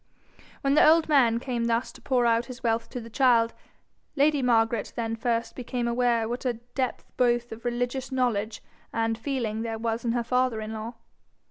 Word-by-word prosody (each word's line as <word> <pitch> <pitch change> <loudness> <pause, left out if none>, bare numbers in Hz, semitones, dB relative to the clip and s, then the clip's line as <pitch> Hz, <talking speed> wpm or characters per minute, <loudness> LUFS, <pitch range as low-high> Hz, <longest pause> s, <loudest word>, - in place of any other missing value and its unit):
When 275 0 +2
the 300 - +6
old 320 +1 +5
man 245 -6 +4
came 240 -2 -2
thus 235 +2 0
to - - -16
pour 250 -3 +1
out 230 0 +2
his 255 -1 -10
wealth 230 0 0
to 250 - -5
the 230 - -9
child, 235 -2 +3 0.6
lady 290 0 +3
Margaret 230 -3 +1
then 225 -1 -2
first 230 0 -1
became 245 -1 -3
aware 235 -1 +1
what 240 +2 -4
a 250 -2 0
depth 245 +2 -4
both 240 -1 +2
of 225 +1 -8
religious 245 +2 -2
knowledge 225 -5 -1 0.3
and 225 0 0
feeling 225 -3 -3
there 225 -1 -3
was 225 +1 -2
in 230 -1 0
her 240 -1 0
father 250 -1 +1
in 215 0 -5
law. 220 +2 -6
235 Hz, 190 wpm, -26 LUFS, 230-250 Hz, 0.6 s, the